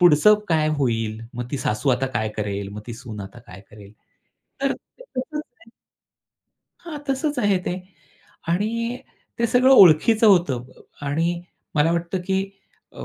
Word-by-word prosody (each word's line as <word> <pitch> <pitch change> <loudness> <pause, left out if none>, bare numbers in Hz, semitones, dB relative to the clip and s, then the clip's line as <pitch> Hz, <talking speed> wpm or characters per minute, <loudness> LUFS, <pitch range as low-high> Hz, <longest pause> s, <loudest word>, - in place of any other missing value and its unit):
पुढचं 175 +4 +7
काय 155 -2 +2
होईल? 115 -4 -1
मग 120 0 -5
ती - - -2
सासू 110 +3 -1
आता 130 +1 +1
काय 110 -4 -2
करेल? 100 -1 -3
मग 105 - -7
ती 120 - -6
सून 115 -4 -8
आता 100 +5 -9
काय 90 +1 -11
करेल? 105 -1 -14 0.7
तर 275 0 +1
ते - - -14
तसंच 300 +4 -3 0.2
आहे. 230 - -19 1.1
हां. 310 -3 -6
तसंच 285 +1 -1
आहे 205 -5 +3
ते. 180 - -1 0.7
आणि 230 +7 -1 0.4
ते 235 - +2
सगळं 250 +3 +4
ओळखीचं 215 - +7
होतं 170 - +3
अ, - - -19 0.3
आणि 165 +4 0 0.3
मला 155 +2 +3
वाटतं 170 +2 -2
की 190 -1 +1 0.5
अ, - - -8
165 Hz, 155 wpm, -23 LUFS, -, 1.1 s, पुढचं